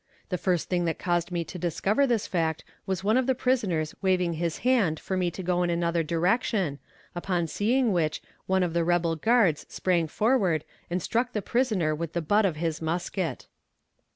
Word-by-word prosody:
The 180 - -1
first 180 -4 0
thing 175 -1 0
that 165 -2 -1
caused 175 0 -1
me 170 -1 -1
to 160 +3 -8
discover 195 - +1
this 235 -4 +1
fact 160 -3 -1 0.2
was 190 0 -2
one 215 +4 +3
of 260 -1 +1
the 260 - +2
prisoners 200 -12 0
waving 180 -3 +2
his 165 0 -2
hand 205 -12 +3
for 190 - -3
me 180 -1 +1
to 185 +2 -7
go 180 0 +1
in 175 - +1
another 170 0 +1
direction, 175 - 0 0.3
upon 175 -1 -1
seeing 225 +8 +1
which 155 -3 0 0.3
one 190 0 +2
of 170 -2 -1
the 170 0 +2
rebel 170 -1 +1
guards 200 -3 +3
sprang 175 -3 +1
forward 190 - +1 0.3
and 180 0 -2
struck 245 +2 0
the 210 - -1
prisoner 215 -11 +1
with 165 +1 -4
the 170 - -1
butt 205 +6 +3
of 170 - -2
his 165 0 -2
musket. 170 +2 -2
175 Hz, 190 wpm, -27 LUFS, 165-205 Hz, 0.3 s, one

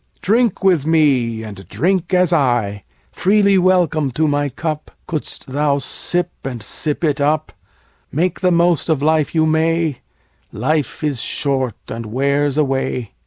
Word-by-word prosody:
Drink 225 0 +1
with 175 -6 +3
me 130 -8 +2
and 100 -4 -10
drink 175 - 0
as 180 -2 +3
I: 120 - +1 0.3
Freely 200 0 +3
welcome 175 -6 +2
to 155 +5 +1
my 145 0 0
cup, 155 +3 -4 0.2
Couldst 155 -3 -4
thou 140 +1 +1
sip 175 +6 -2
and 125 -4 -5
sip 150 +8 -3
it 145 -3 +1
up: 150 +2 +1 0.6
Make 175 +4 0
the 185 - +2
most 170 -1 +2
of 150 -3 +1
life 155 0 +1
you 160 -1 +3
may, 160 -2 +1 0.5
5 - - -35
Life 155 -1 -1
is 140 -6 -1
short 130 -5 -1
and 115 -1 -6
wears 140 +4 0
away. 135 -5 -1
150 Hz, 150 wpm, -18 LUFS, 135-170 Hz, 0.6 s, with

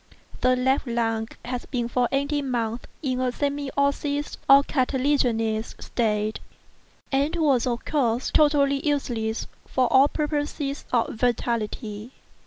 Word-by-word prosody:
The 255 0 +4
left 260 +2 +1
lung 225 -2 0 0.2
had 245 0 -5
been 240 -3 -1
for 245 0 +1
eighteen 280 0 0
months 235 -1 -2 0.2
in 255 -3 -1
a 255 -1 +1
semi 285 +2 -2
osseous 285 +1 0
or 275 +1 +8
cartilaginous 255 -5 0
state, 215 -2 -1 0.7
and 285 +4 +1
was, 280 -7 +2
of 240 -1 -2
course, 250 -5 0
entirely 280 -2 +4
useless 235 -7 -1 0.2
for 255 - +1
all 270 +2 +7
purposes 290 -2 -2
of 235 -2 +1
vitality. 230 -1 -2
255 Hz, 125 wpm, -25 LUFS, 235-280 Hz, 0.7 s, or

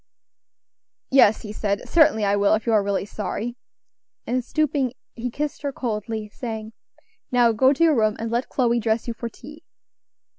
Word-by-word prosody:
"Yes," 255 -5 +5
he 210 -1 -7
said, 200 -1 -2
"certainly 285 -10 +4
I 200 0 +2
will, 205 +1 +3
if 215 - -4
you 230 - +1
are 215 - +5
really 200 -1 -1
sorry;" 215 +3 -4 0.7
and 250 +1 -1
stooping, 285 -3 0 0.2
he 245 +1 -4
kissed 295 +4 -4
her 285 -1 -2
coldly, 220 -3 -4
saying, 220 0 -6 0.6
"Now 245 -2 +4
go 260 +5 +4
to 290 +4 +1
your 320 -3 +5
room, 215 -2 +2
and 225 0 -4
let 240 +2 -1
Chloe 240 -2 +1
dress 220 +1 -1
you 235 - -2
for 235 0 -5
tea." 300 +7 -13
230 Hz, 175 wpm, -23 LUFS, 215-260 Hz, 0.7 s, Yes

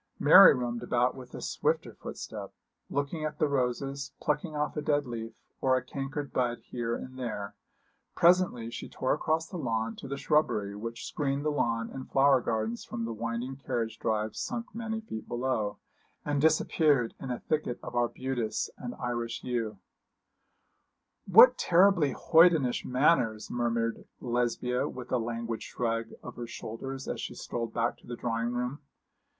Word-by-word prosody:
Mary - - +9
roamed 120 -1 -2
about 120 +1 +1
with 125 -2 -11
a - - -7
swifter - - -1
footstep, - - -7 0.4
looking 145 +3 -2
at 155 0 -3
the 155 - +2
roses, 135 +1 -1
plucking 150 +1 -1
off 150 0 -1
a 150 - -1
dead 145 -1 +1
leaf, 115 -2 -5 0.3
or 130 -1 +4
a 125 - -3
cankered 140 +2 -5
bud 120 -2 +1
here 120 -1 -3
and 130 0 -8
there. 105 -5 -4 0.6
Presently 170 -10 +3
she - - -6
tore 130 - 0
across 160 +2 0
the 180 - -7
lawn 115 -4 -1
to - - -8
the 140 +1 -4
shrubbery 115 -11 +1
which 115 +2 -6
screened 140 0 -2
the 150 - +2
lawn 115 -5 0
and 130 - -7
flower 135 -1 +5
gardens 110 0 -2
from 115 - -4
the 115 - -3
winding 115 +4 -4
carriage 120 -5 -3
drive 110 0 -1
sunk 235 0 -4
many 225 -1 -3
feet 110 - -7
below, 120 -5 -1 0.5
and 145 -1 0
disappeared 150 -5 +3
in 135 - -6
a 125 - -2
thicket 155 -6 -2
of - - -7
arbutus 120 -1 -1
and 125 -1 -5
Irish 120 -2 -3
yew. 115 -4 -2 1.5
'What 235 +7 +8
terribly 180 -5 +4
hoydenish 160 -6 +4
manners!' 125 -5 +2
murmured 115 -1 -1 0.2
Lesbia, 125 0 0
with 125 -1 -8
a 125 - +2
languid 115 0 -3
shrug 115 -1 -2 0.2
of 125 - -9
her 120 -1 -5
shoulders, 135 +5 -6
as - - -3
she - - -5
strolled 115 -1 -4
back 115 +1 0
to - - -19
the 120 - -4
drawing 115 0 -1
room. 125 +4 -2
125 Hz, 160 wpm, -29 LUFS, 115-145 Hz, 1.5 s, Mary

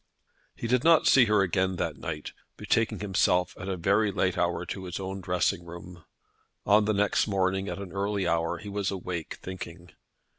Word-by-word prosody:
He - - -6
did 125 +1 +2
not 165 -1 +5
see 130 -3 +6
her 105 -2 +3
again 95 0 0
that - - -2
night, 75 - -6 0.3
betaking 110 -3 0
himself 90 -3 +1
at 95 - -5
a 95 - -2
very 100 +5 +2
late - - 0
hour - - 0
to 95 - -6
his 90 +1 -5
own 95 0 -5
dressing 90 -1 0
room. 85 0 -11 0.6
On 105 +1 +5
the 110 - +1
next 100 +2 +2
morning 95 0 0
at - - -4
an 100 -2 -7
early 100 0 -1
hour 85 +1 0
he 105 - -10
was 100 -1 -1
awake 90 -4 -4
thinking. 90 -1 -8
95 Hz, 185 wpm, -28 LUFS, 90-100 Hz, 0.6 s, see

